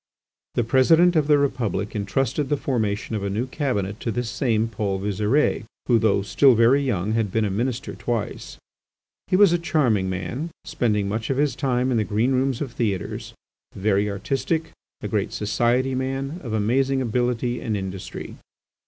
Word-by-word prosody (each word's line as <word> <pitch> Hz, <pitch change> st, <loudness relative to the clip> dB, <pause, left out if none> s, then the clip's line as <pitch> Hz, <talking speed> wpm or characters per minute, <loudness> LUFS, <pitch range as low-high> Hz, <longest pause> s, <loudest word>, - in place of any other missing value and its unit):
The 120 Hz, -, +2 dB
President 160 Hz, +9 st, +4 dB
of 155 Hz, -2 st, +2 dB
the 150 Hz, -1 st, +5 dB
Republic 110 Hz, -8 st, -1 dB
entrusted 130 Hz, +7 st, -1 dB
the 145 Hz, -, +1 dB
formation 110 Hz, -6 st, -2 dB
of 105 Hz, -, -3 dB
a 100 Hz, -, -1 dB
new 110 Hz, +5 st, -1 dB
Cabinet 115 Hz, -8 st, -2 dB
to -, -, -3 dB
this 115 Hz, 0 st, -2 dB
same 115 Hz, -3 st, +1 dB
Paul 100 Hz, -3 st, -2 dB
Visire, 105 Hz, +9 st, +1 dB, 0.2 s
who, 120 Hz, -2 st, +4 dB
though 100 Hz, -3 st, +2 dB
still 130 Hz, +5 st, +4 dB
very 120 Hz, +5 st, +5 dB
young, 110 Hz, -7 st, -1 dB
had 110 Hz, -3 st, 0 dB
been 110 Hz, +1 st, +1 dB
a 100 Hz, -, -1 dB
Minister 120 Hz, +5 st, -2 dB
twice. 115 Hz, -3 st, -4 dB, 0.7 s
He -, -, +1 dB
was 195 Hz, -2 st, +6 dB
a 175 Hz, -, +2 dB
charming 125 Hz, -, +1 dB
man, 105 Hz, -, -4 dB, 0.2 s
spending 105 Hz, -4 st, 0 dB
much 110 Hz, +3 st, -3 dB
of 135 Hz, -, 0 dB
his 145 Hz, 0 st, +1 dB
time 130 Hz, -2 st, 0 dB
in 120 Hz, -, +2 dB
the 110 Hz, -, +2 dB
green 110 Hz, +5 st, 0 dB
rooms 130 Hz, -1 st, 0 dB
of 135 Hz, -4 st, -3 dB
theatres, 105 Hz, -7 st, -3 dB, 0.4 s
very 100 Hz, +1 st, +1 dB
artistic, 135 Hz, -, -2 dB, 0.3 s
a -, -, -3 dB
great -, -, -1 dB
society 120 Hz, +5 st, +1 dB
man, 135 Hz, +5 st, -3 dB
of 120 Hz, -, -5 dB
amazing 130 Hz, +6 st, +1 dB
ability 120 Hz, 0 st, -1 dB
and 110 Hz, -3 st, -1 dB
industry. 95 Hz, -1 st, -6 dB
120 Hz, 170 wpm, -23 LUFS, 105-135 Hz, 0.7 s, was